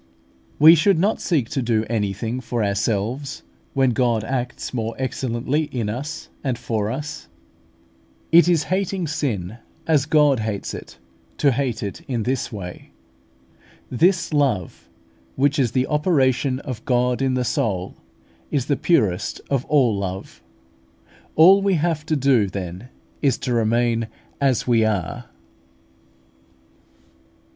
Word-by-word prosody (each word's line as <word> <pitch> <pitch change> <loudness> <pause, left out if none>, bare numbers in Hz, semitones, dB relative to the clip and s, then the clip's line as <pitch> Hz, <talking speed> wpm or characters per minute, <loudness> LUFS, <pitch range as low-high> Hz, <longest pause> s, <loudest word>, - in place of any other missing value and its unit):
We 155 +2 +9
should 170 +3 +3
not 200 +6 +1
seek 145 -10 0
to 135 - -1
do 115 -2 +1
anything 110 +2 -2
for 120 -3 -2
ourselves 110 +6 -2 0.3
when 135 -2 +3
God 120 -3 +1
acts 125 +1 -4
more 115 -2 -3
excellently 130 +3 -1
in 120 -7 -3
us 145 +8 -5 0.2
and 130 -4 -1
for 110 -3 -2
us. 145 +5 -5 1.0
It 170 +1 +7
is 165 -4 +3
hating 190 -1 -1
sin 120 - -3 0.3
as 150 -3 +2
God 150 -5 +4
hates 110 -2 -3
it - - -9 0.4
to 140 - +3
hate 125 -4 -2
it 100 - -5
in 120 -4 -2
this 130 +1 -2
way. 90 -5 -8 1.0
This 170 +6 +2
love, 130 - -1 0.5
which 140 +2 +2
is 125 -5 +2
the 130 -1 +2
operation 135 -4 +1
of 125 -5 -6
God 125 0 +1
in 130 -1 +1
the 125 - 0
soul, 95 -6 -1 0.5
is 135 -4 -1
the 145 - +1
purest 105 - +1
of 135 -2 0
all 130 -8 +3
love. 95 -1 -5 0.9
All 190 +5 +7
we 195 -1 +2
have 160 -1 -1
to 155 - +1
do 130 -7 +3
then 95 +4 -6 0.3
is 135 -5 +2
to 125 - -2
remain 115 0 +1 0.3
as 135 -4 +2
we 115 -2 +3
are. 100 -6 -2
125 Hz, 135 wpm, -22 LUFS, 110-145 Hz, 1.0 s, We